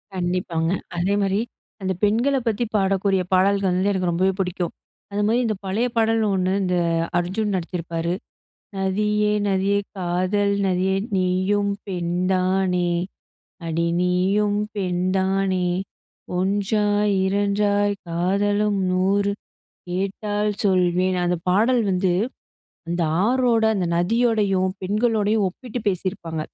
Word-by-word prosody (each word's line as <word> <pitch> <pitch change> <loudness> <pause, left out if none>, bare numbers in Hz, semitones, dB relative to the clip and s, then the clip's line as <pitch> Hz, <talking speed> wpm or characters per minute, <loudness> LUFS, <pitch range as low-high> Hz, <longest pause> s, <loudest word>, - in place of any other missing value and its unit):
கண்டிப்பாங்க. 175 -2 -1 0.3
அதேமாரி, 195 +2 +1 0.4
அந்த 190 0 -1
பெண்களப் 245 +5 +2
பத்தி 225 +1 +1
பாடக்கூடிய 195 -1 +2
பாடல்கள் 195 +1 +3
வந்து 190 +3 +1
எனக்கு 185 -3 0
ரொம்பவே 185 +3 +2
புடிக்கும். 180 -2 -2 0.4
அதுமாரி 210 +4 +1
இந்த 215 -2 0
பழைய 215 +6 0
பாடல் 225 0 +3
ஒன்னு 185 0 +1
இந்த 180 -1 0 0.4
அர்ஜுன் 195 +4 -1
நடிச்சிருப்பாரு, 170 -1 -3 0.7
"நதியே! 210 +2 +1 0.2
நதியே! 195 +1 +1 0.2
காதல் 185 +3 0
நதியே! 190 +1 +1 0.2
நீயும் 185 +2 +1 0.2
பெண்தானே, 185 0 0 0.8
அடி 165 +1 0
நீயும் 195 +3 +1 0.2
பெண்தானே! 190 0 0 0.7
ஒன்றாய் 205 +2 +1
இரண்டாய் 205 +1 +1
காதலும் 200 +4 +1
நூறு 195 +2 +2 0.6
கேட்டால் 205 +3 -1
சொல்வேன்" 185 -1 +2
அந்த 175 0 +1
பாடல் 230 +6 +3
வந்து 185 -1 +1 0.8
அந்த 170 +1 -1 0.2
ஆறோட, 245 -1 +2
அந்த 180 -3 0
நதியோடையும் 200 -1 +2
பெண்களோடையும் 215 +1 +1
ஒப்பிட்டு 245 +6 -7
பேசியிருப்பாங்க. 180 -4 -3
195 Hz, 100 wpm, -22 LUFS, 180-205 Hz, 0.8 s, பாடல்கள்